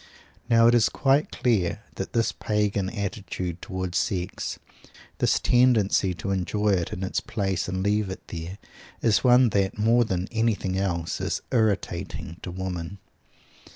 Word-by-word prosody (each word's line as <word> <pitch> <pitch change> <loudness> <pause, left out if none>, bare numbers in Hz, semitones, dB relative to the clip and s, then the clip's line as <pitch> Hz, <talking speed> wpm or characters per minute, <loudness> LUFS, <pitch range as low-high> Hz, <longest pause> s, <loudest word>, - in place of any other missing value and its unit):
Now 115 -1 +6
it 120 - +6
is 120 -2 +4
quite 140 +2 +2
clear 105 -8 0
that - - -6
this 115 -1 +2
pagan 105 -2 -1
attitude 95 -4 -4
towards 95 -2 -2
sex, 90 -3 -3 0.6
this - - +3
tendency 110 -7 +3
to 100 - -4
enjoy 105 +3 0
it 90 -4 +1
in 90 - -4
its 95 - -1
place 95 -5 -2
and 95 0 -2
leave 105 0 +1
it 95 - -8
there, 85 +3 -6 0.5
is 110 -2 +3
one 125 -1 +6
that, 100 -1 0
more 115 +3 +4
than 95 -4 -2
anything 110 -5 0
else, 85 -4 -2
is - - -2
irritating 105 - -1
to - - -6
women. 90 0 -5
100 Hz, 150 wpm, -25 LUFS, 95-110 Hz, 0.6 s, Now